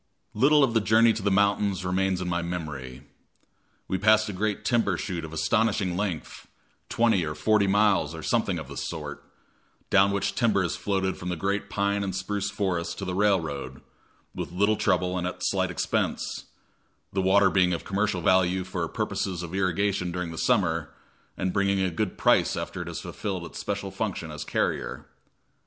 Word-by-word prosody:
Little 145 +6 +5
of 125 -4 +2
the 115 - +3
journey 110 +2 +5
to 110 - -4
the 100 - +1
mountains 100 -1 +2
remains 95 0 0
in 90 - -3
my 85 -1 0
memory. 75 -7 -5 0.8
We 95 - -1
passed 110 0 +4
a - - -4
great 105 +2 -2
timber 115 -6 +2
chute 85 -3 -4
of 80 - -7
astonishing 100 +2 +1
length 90 -5 -4 0.4
twenty 115 -6 +2
or 75 -1 -3
forty 100 +5 +2
miles, 95 -6 +3
or 80 - -8
something - - +1
of - - -6
the - - -9
sort - - -5 0.7
down 100 0 +5
which 100 0 -1
timber 105 -3 +2
is 85 - -1
floated 95 +1 -1
from 90 - -5
the 90 - -1
great 100 +4 -2
pine 100 0 0
and 95 -2 -3
spruce 100 +2 -2
forests 85 -4 -2
to 100 - -5
the 90 - -3
railroad, 80 -10 0 0.5
with - - -5
little 100 +4 +2
trouble 90 -3 +1
and 90 - -2
at 90 0 -6
slight 95 -1 +1
expense; 90 - -2 0.7
the 95 - +1
water 95 +1 +4
being 90 -2 +3
of 85 - -3
commercial 100 -2 0
value 95 +1 +3
for 95 - -3
purposes 90 -3 -3
of 85 0 -7
irrigation 95 -1 0
during 90 -1 -3
the 80 - -8
summer, 85 - +1 0.5
and 95 0 -1
bringing 100 -1 +2
a 95 -1 +1
good 90 +3 -2
price - - +3
after - - -4
it - - -6
has - - -5
fulfilled 95 -4 -4
its - - -8
special 100 -1 -3
function 95 -5 -3
as 75 0 -5
carrier. - - -2
95 Hz, 180 wpm, -26 LUFS, 90-100 Hz, 0.8 s, Little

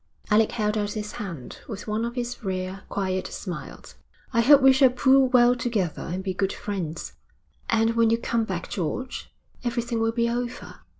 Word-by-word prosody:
Alec 215 +1 +4
held 215 -1 0
out 205 0 -2
his 210 -1 -4
hand, 170 -11 -7
with 205 -3 -6
one 215 +2 -1
of 235 +1 -5
his 245 -1 -4
rare, 185 0 -4
quiet 185 -2 -1
smiles. 180 -4 -7 0.4
'I 230 - +4
hope 280 +4 +7
we 265 0 +8
shall 265 0 +6
pull 260 +2 +4
well 245 -1 +5
together 220 -9 -1
and 180 +3 -4
be 190 -1 -2
good 195 +1 0
friends.' 175 -6 -5 0.6
'And 225 0 +2
when 230 -1 +4
you 230 - +3
come 235 0 0
back, 185 -4 -4
George, 200 - -4 0.3
everything 235 -1 -1
will 225 0 +2
be 235 0 +1
over. 240 +1 -4
225 Hz, 180 wpm, -25 LUFS, 190-240 Hz, 0.6 s, we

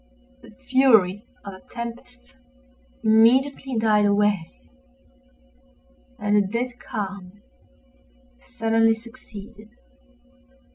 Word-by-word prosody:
The - - -15
fury 230 -5 +2 0.2
of 200 - -7
the 190 - -13
tempest 245 +2 -9 0.7
immediately 250 +4 +3
died 215 -2 +3
away, 205 -4 +1 1.7
and 205 0 0
a - - +5
dead 240 +5 -3
calm 200 -4 -7 1.0
sullenly 225 - +1
succeeded. 225 -2 -13
225 Hz, 80 wpm, -23 LUFS, 205-245 Hz, 1.7 s, a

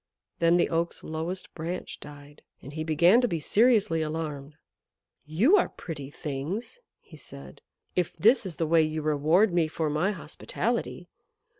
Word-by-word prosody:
Then 170 +1 +4
the 175 - +3
Oak's 170 0 -2
lowest 165 +4 -4
branch 170 +3 -5
died, 145 0 -13 0.2
and 140 - -11
he 155 +1 -3
began 170 +9 +4
to 245 - +2
be 170 -7 -2
seriously 210 -2 +3
alarmed. 155 -2 -4 0.7
"You 220 - +4
are - - +2
pretty 145 -5 -8
things," 155 - -5 0.2
he - - -16
said, - - -12 0.3
"if 180 -2 -1
this 225 +10 +4
is 185 -5 -6
the 165 - -1
way 165 +1 +4
you 155 0 -2
reward 155 +7 +3
me 170 -2 +2
for 155 -1 -2
my 155 +6 +1
hospitality. 200 - -4
165 Hz, 155 wpm, -27 LUFS, 155-185 Hz, 0.7 s, Then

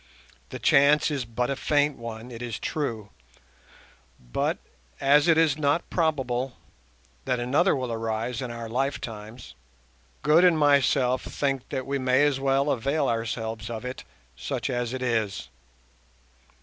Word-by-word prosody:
The - - -6
chance 145 +2 +4
is 135 -4 -2
but 120 +3 -2
a - - 0
faint 145 +1 +1
one, 115 +1 -8
it 115 0 -8
is 120 -3 -4
true; 115 -9 -3 1.1
but, - - -2 0.4
as 145 +2 +4
it 165 -2 +5
is 155 -3 +3
not 145 +3 +1
probable 135 - -1 0.7
that 125 -2 0
another 140 +10 +2
will 130 -3 -3
arise 115 +1 -2
in 125 - -4
our 115 -1 -6
lifetimes, 115 -2 -4 0.7
Good 155 +4 +5
and 175 -3 +5
myself 140 -3 +3
think 135 -3 -2
that 130 -1 -3
we 140 0 -2
may 130 +2 +3
as 140 -2 +1
well 135 +1 +2
avail 140 +5 0
ourselves 115 -1 -3
of 115 +1 -5
it, 125 +1 -6 0.3
such - - -3
as 120 -1 -2
it 130 0 -4
is. 110 - -1
130 Hz, 145 wpm, -26 LUFS, 115-145 Hz, 1.1 s, it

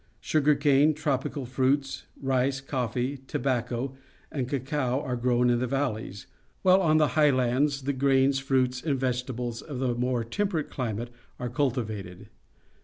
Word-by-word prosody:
Sugar 150 -1 +2
cane, 145 +1 +4
tropical 140 -2 -2
fruits, 135 +2 0
rice, 135 0 +1
coffee, 130 0 -2
tobacco, 130 -1 -2 0.4
and 130 -4 -3
cacao 135 -1 -1
are 130 -3 -3
grown 125 0 +2
in 120 - +2
the 125 - -1
valleys, 115 -7 -2 0.4
while 190 0 +6
on 155 -3 +4
the 155 -1 +4
highlands 140 -1 +2
the 140 +1 0
grains, 135 0 +3
fruits, 130 -2 +1
and 140 -3 -1
vegetables 125 -2 -2
of 145 -5 -7
a 125 -2 +1
more 125 0 0
temperate 165 - -2
climate 120 -2 -3 0.3
are 125 - -4
cultivated. 110 -7 -3
130 Hz, 140 wpm, -27 LUFS, 125-140 Hz, 0.4 s, while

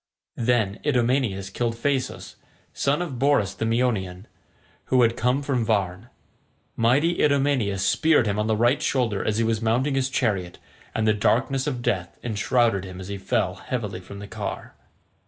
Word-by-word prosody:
Then 115 -4 +1
Idomeneus 120 -8 0
killed 115 +2 -1
Phaesus, 130 +2 -2 0.4
son 145 +5 0
of 135 -8 -6
Borus 135 -8 +2
the 115 - -3
Meonian, 110 -6 -1 0.6
who 130 -1 +3
had 115 0 +2
come 125 +5 +1
from 130 -4 0
Varne. 100 -5 -1 0.7
Mighty 140 +9 +2
Idomeneus 135 -9 +2
speared 160 -6 +3
him 105 0 -1
on 105 - 0
the 110 - +2
right 120 +5 +3
shoulder 120 -7 0
as 110 - 0
he 115 - +2
was 115 -1 0
mounting 120 +5 +1
his 135 -1 0
chariot, 100 -9 -1 0.4
and 110 0 +1
the 110 - +5
darkness 130 +6 +1
of 125 -4 -3
death 90 -5 -2
enshrouded 115 -2 +1
him 95 -1 -8
as 95 +1 -8
he 100 -1 -5
fell 95 -1 0
heavily 105 -4 -4
from 100 +2 -11
the 100 0 -8
car. - - -6
115 Hz, 165 wpm, -24 LUFS, 100-130 Hz, 0.7 s, the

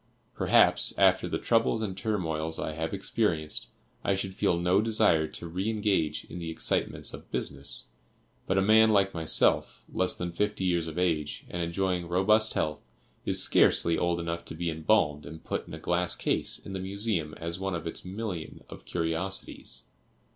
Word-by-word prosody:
Perhaps, - - +4
after - - +4
the - - -1
troubles 115 -1 +1
and 95 -3 -3
turmoils 80 -6 -1
I 80 - -3
have 80 +1 -3
experienced, 90 -6 -1 0.4
I 100 - +2
should 95 0 -3
feel 85 - +1
no 90 +3 +3
desire 105 -8 +3
to 85 - -8
re 95 +6 -2
engage 105 -8 0
in 90 - -8
the 85 -1 -5
excitements 80 - -1
of - - -10
business, 70 +1 0 0.6
but 95 - +1
a 95 - +4
man 110 +2 +6
like 100 -2 +3
myself, 80 -2 +1
less 95 - 0
than 90 -1 -3
fifty 105 +2 -1
years 85 -2 +1
of 80 +1 -7
age, 80 -5 -1
and 85 - -3
enjoying 90 +1 -1
robust 105 +5 +3
health, 75 -1 -1 0.5
is - - +4
scarcely 85 - +4
old 85 +1 0
enough 85 0 -3
to - - -8
be 85 +1 -2
embalmed 80 -2 +1
and 80 +3 -10
put - - -4
in - - -10
a - - -9
glass 90 0 0
case - - 0
in 100 - -10
the 95 - -3
Museum 95 -4 -1
as 85 +2 -3
one 95 -1 -2
of 85 - -5
its 80 - -4
million 95 -3 -6
of - - -11
curiosities. 85 +3 -2
90 Hz, 175 wpm, -28 LUFS, 80-100 Hz, 0.6 s, man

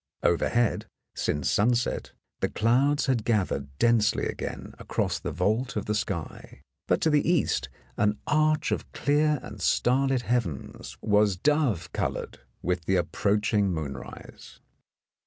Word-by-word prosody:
Overhead, 115 +7 +1 0.3
since 75 -1 -1
sunset, 120 +2 +1 0.3
the - - 0
clouds 130 +6 +2
had 125 -5 +1
gathered 95 - 0
densely 115 -2 +3
again - - -5
across - - -1
the - - -4
vault 110 +8 0
of 105 - -2
the 105 - -1
sky, 100 -6 -5 0.2
but - - +2
to 160 - +3
the 150 +2 +2
east 175 - +1 0.3
an 105 +1 +2
arch 155 0 +2
of - - -3
clear 150 +1 +2
and - - -9
star 130 +3 +2
lit 130 -2 0
heavens 110 - -3
was 105 -2 +3
dove 145 - +1
coloured - - -3 0.2
with 90 -2 -1
the 95 - +2
approaching 105 +2 +1
moonrise. 75 -5 -7
110 Hz, 135 wpm, -27 LUFS, 95-135 Hz, 0.3 s, densely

